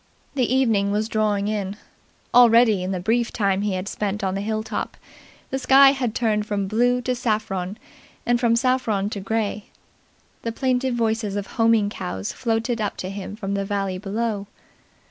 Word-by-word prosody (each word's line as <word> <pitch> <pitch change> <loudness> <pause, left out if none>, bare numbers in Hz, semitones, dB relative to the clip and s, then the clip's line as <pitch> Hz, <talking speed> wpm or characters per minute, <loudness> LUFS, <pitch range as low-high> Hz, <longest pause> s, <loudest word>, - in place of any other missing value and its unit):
The 255 -4 0
evening 225 -7 +2
was 210 +1 0
drawing 210 -2 0
in. 205 -2 -2 0.6
Already, 235 -4 +6
in 185 - -3
the 185 - -2
brief 230 +6 0
time 200 -3 +1
he 205 -1 -1
had 185 +1 -4
spent 205 -1 -3
on 190 -1 0
the 195 - -2
hill 215 +1 -2
top, - - -4 0.5
the 265 - -1
sky 270 +1 +7
had 250 -5 -2
turned 215 -3 0
from 205 -2 -1
blue 245 +4 +2
to 255 - 0
saffron 210 -5 -2 0.5
and 240 0 +2
from 235 -2 +3
saffron 235 -5 +1
to 205 - -4
grey. 210 0 -2 0.8
The 230 - -3
plaintive 255 0 0
voices 225 -3 0
of 205 -1 -2
homing 225 -2 +2
cows 95 - -4
floated 230 -1 -1
up 205 - -2
to 185 - -5
him 200 +1 -6
from 200 -2 -4
the 200 0 -1
valley 195 -2 -2
below. 210 0 -2
215 Hz, 175 wpm, -23 LUFS, 200-235 Hz, 0.8 s, sky